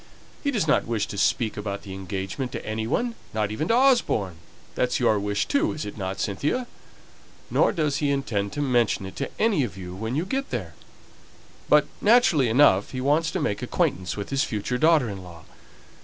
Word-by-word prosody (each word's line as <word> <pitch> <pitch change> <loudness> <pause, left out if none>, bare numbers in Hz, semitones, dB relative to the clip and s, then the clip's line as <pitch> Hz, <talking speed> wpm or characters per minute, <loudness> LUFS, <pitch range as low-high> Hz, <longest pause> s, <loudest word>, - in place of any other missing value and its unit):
He 285 - +1
does 215 - 0
not 150 - +2
wish 115 -3 0
to - - -5
speak 115 -3 +1
about 100 -1 -4
the 95 - -8
engagement 95 +6 -4
to - - -5
any 110 +1 -3
one 240 - 0 0.2
not 105 -1 0
even 155 +9 -2
to 230 - +3
Osborne 240 - +2 0.4
that's 125 - 0
your 110 -4 +3
wish, 105 0 -1
too, 285 - +1
isn't 105 -9 -6
it, 95 +1 -3
Cynthia? 145 - -1 0.9
Nor - - +3
does 150 -5 0
he 145 -1 0
intend 115 -8 -1
to 145 - -1
mention 120 -7 +1
it 95 0 -9
to - - -3
any 210 -10 +3
of 100 -6 -5
you 90 -1 -7
when 110 +6 -4
you 160 +5 0
go 270 +7 -1
there; - - -4 1.0
but, - - +6 0.2
naturally 205 - +4
enough, 110 -6 +4
he 130 - -3
wants 150 +5 +2
to 190 - -2
make 105 -10 -1
acquaintance 90 +1 -1
with 100 - -5
his 135 -1 +2
future 115 +4 -2
daughter 155 -4 +4
in 100 -3 -6
law. 85 -2 -12
120 Hz, 195 wpm, -25 LUFS, 100-150 Hz, 1.0 s, but